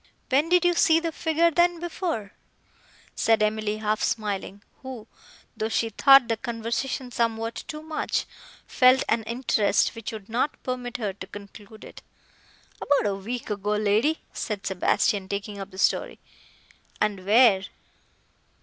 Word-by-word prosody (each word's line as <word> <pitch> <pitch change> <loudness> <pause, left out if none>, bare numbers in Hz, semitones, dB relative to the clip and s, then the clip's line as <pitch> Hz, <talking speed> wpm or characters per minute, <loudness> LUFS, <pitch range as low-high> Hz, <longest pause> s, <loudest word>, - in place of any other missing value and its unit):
"When 285 +5 +3
did 355 0 +4
you 350 - +4
see 330 -2 +4
the 330 0 -3
figure, 325 +1 +1
then, 345 +1 +2
before?" 330 - -4 0.8
said 225 -1 +2
Emily 215 0 -1
half 215 0 -1
smiling, 205 -2 -3 0.2
who, 260 -5 -8 0.5
though 220 0 -2
she 225 0 0
thought 270 +2 +6
the 225 -1 -1
conversation 235 +2 -3
somewhat 230 -1 -2
too 305 0 -7
much, 315 -1 -2 0.4
felt 255 0 +4
an 225 +1 +1
interest, 230 -4 +1
which 230 -2 -6
would 215 -3 -9
not 240 +6 -2
permit 250 -1 -4
her 210 -5 -3
to 185 -1 -10
conclude 205 +2 -12
it. - - -12 0.8
"About 275 -8 +2
a - - -3
week 225 +4 -5
ago, 205 0 -1
lady," 215 +9 +1
said 210 -3 -4
Sebastian, 190 +1 0
taking 200 0 -4
up 195 0 -7
the 190 - -14
story. - - +1 0.8
"And 205 -3 -1
where?" 205 -2 +5
225 Hz, 145 wpm, -25 LUFS, 205-265 Hz, 0.8 s, thought